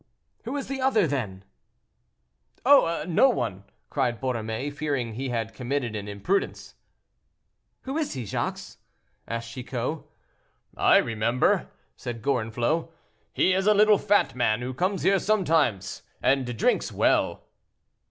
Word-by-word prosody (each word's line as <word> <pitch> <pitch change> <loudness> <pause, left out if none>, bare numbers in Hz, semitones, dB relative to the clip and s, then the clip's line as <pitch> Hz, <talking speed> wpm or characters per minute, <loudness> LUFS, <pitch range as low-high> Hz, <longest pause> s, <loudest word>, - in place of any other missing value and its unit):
"Who 260 +5 -3
is 275 - -4
the 270 -1 -4
other, 255 -7 +3
then?" 110 -11 -3 1.2
"Oh! 250 -12 +5
no 180 +10 +5
one!" 100 - -2 0.3
cried 125 -5 0
Borromée, 120 +2 -3
fearing 140 -6 -2
he 130 +4 -4
had 115 -2 -3
committed 125 0 -2
an 105 -1 -5
imprudence. 105 - -2 1.1
"Who 270 +4 -3
is 310 - -2
he, 130 -4 -5
Jacques?" - - -4 0.5
asked 115 0 -4
Chicot. 125 +4 -4 0.8
"I - - +5
remember," 115 +2 +1 0.3
said 120 -2 -7
Gorenflot; 125 +5 0 0.4
"he 185 - +2
is 190 +2 +1
a 210 - +6
little 210 0 +5
fat 205 0 +2
man 120 -2 +1
who 130 +1 -4
comes 185 +8 -1
here 195 +1 +4
sometimes 165 - +1 0.2
and 130 -3 +1
drinks - - +1
well." - - +1
130 Hz, 130 wpm, -26 LUFS, 115-190 Hz, 1.2 s, a